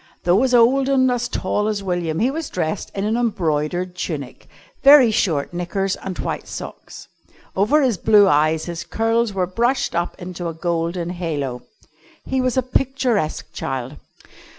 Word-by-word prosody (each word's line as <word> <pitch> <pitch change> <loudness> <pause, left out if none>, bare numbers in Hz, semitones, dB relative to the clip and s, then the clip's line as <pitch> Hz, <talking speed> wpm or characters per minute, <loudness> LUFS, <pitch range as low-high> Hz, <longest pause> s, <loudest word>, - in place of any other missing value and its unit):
Though 180 +5 +3
as 255 -1 +3
old 260 +3 +4
and 260 -2 +3
as 245 -1 -1
tall 210 -2 -1
as 210 -2 -2
William, 175 -4 -2
he 240 +7 +2
was 320 +1 -4
dressed 175 +1 -3
in 195 - -2
an 220 +2 0
embroidered 180 -5 -1
tunic, 145 -8 -5 0.3
very 275 -4 +8
short 160 -8 0
knickers, 190 +2 -2
and 190 -2 -7
white - - -4
socks. - - -9 0.5
Over 270 +10 +3
his 235 -9 +1
blue 210 -2 +5
eyes 155 0 +2
his 170 0 -5
curls 225 0 0
were 185 -1 +1
brushed 235 +8 0
up 170 +2 -2
into 175 -1 -6
a 165 - -5
golden 170 +1 -2
halo. 145 -8 -3 0.6
He 265 0 0
was 255 0 0
a 260 - +3
picturesque 245 - -1
child. 135 -2 -4
190 Hz, 160 wpm, -21 LUFS, 170-240 Hz, 0.6 s, very